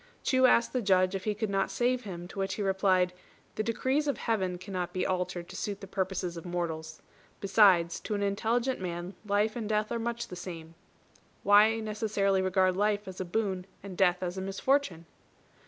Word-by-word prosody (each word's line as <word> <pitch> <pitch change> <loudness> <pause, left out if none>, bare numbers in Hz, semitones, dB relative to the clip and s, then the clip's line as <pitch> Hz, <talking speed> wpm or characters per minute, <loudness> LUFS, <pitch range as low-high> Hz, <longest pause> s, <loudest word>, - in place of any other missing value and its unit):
Chu 260 -1 +4
asked 235 -1 +3
the 255 - 0
Judge 185 -2 +3
if 195 -1 -4
he 210 -1 0
could 215 -1 -2
not 195 0 +1
save 250 0 0
him; 175 -3 -6
to 195 - -8
which 195 0 -1
he 210 - -2
replied, 190 -2 +2 0.4
"The - - -2
decrees 260 +6 0
of 285 - 0
Heaven 190 -6 -1
cannot 180 -1 -4
be 185 - -1
altered 180 -1 -2
to - - -9
suit 205 -1 -3
the - - -8
purposes 185 -2 -2
of 165 - -7
mortals. 160 -3 -4 0.4
Besides, 190 -4 +4
to 215 - -3
an 205 - -1
intelligent 230 +6 0
man 175 0 -5
life 210 +2 +1
and 225 -3 -4
death 215 0 0
are 235 - -1
much 235 +1 -3
the - - -7
same. 165 -3 -8 0.7
Why 210 +2 +6
necessarily 210 -3 0
regard 185 -1 +2
life 205 +1 0
as 190 0 -6
a - - -3
boon 190 -1 -2 0.2
and 195 -2 -7
death 180 -1 +2
as 180 +1 -3
a - - -3
misfortune?" 195 - 0
195 Hz, 195 wpm, -29 LUFS, 180-215 Hz, 0.7 s, Why